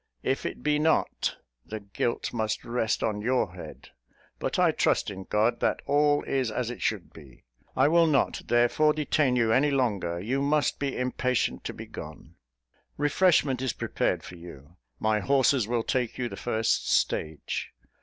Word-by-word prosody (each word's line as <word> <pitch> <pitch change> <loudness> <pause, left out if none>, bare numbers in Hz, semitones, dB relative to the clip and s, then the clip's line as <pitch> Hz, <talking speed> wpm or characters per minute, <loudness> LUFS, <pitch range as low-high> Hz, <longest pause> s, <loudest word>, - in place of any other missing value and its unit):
If 135 - -1
it - - -8
be 150 0 +2
not, 160 +1 +1 0.3
the 110 - -6
guilt 100 +3 -3
must 110 -2 -2
rest 115 -2 -1
on 105 -2 -1
your 125 +3 0
head; - - -10 0.5
but - - -2
I - - +4
trust - - +1
in 95 -1 -8
God 110 +3 +1
that - - +1
all 145 +1 +3
is 130 -3 -1
as 120 +2 -2
it 120 - -9
should 105 -5 -2
be. 70 -6 -15 0.3
I - - +5
will 165 +1 +4
not, 145 -3 +1
therefore, 120 +6 +3
detain 150 -3 +1
you 115 -2 +2
any 145 +5 +3
longer: 105 -11 0
you 125 +9 -1
must 145 +1 +1
be 140 -2 -2
impatient 125 0 -1
to - - -4
be - - -8
gone. - - -10 0.6
Refreshment 145 -3 +2
is 130 -3 -1
prepared - - -1
for 90 - -10
you: 85 -2 -13 0.2
my 110 -1 +1
horses 135 -2 +2
will 120 -1 0
take 125 -3 -1
you 125 - -1
the - - -7
first 110 -2 0
stage. 80 -1 -1
125 Hz, 170 wpm, -27 LUFS, 110-140 Hz, 0.6 s, I